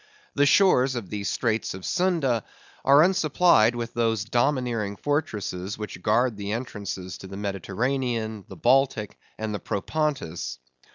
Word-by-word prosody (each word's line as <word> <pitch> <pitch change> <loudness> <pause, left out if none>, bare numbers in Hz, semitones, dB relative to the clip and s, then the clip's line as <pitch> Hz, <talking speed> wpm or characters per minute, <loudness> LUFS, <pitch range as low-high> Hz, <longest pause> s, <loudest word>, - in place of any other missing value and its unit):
The 145 0 +3
shores 135 -9 +4
of 115 -6 -5
the 105 -1 -3
Straits 110 -1 -1
of 95 - -9
Sunda 165 - +1 0.4
are 140 +3 +7
unsupplied 165 - +4
with 120 0 -4
those 115 -3 0
domineering 120 -4 0
fortresses 105 - -2
which 105 -4 -7
guard 115 +3 +2
the 100 0 -3
entrances 100 -6 -5
to 95 - -9
the 95 +1 -8
Mediterranean, 110 +3 -2
the - - -11
Baltic, 125 -4 +2 0.2
and 110 -1 -3
the 105 - -3
Propontis. 100 - -2
115 Hz, 135 wpm, -25 LUFS, 100-135 Hz, 0.4 s, are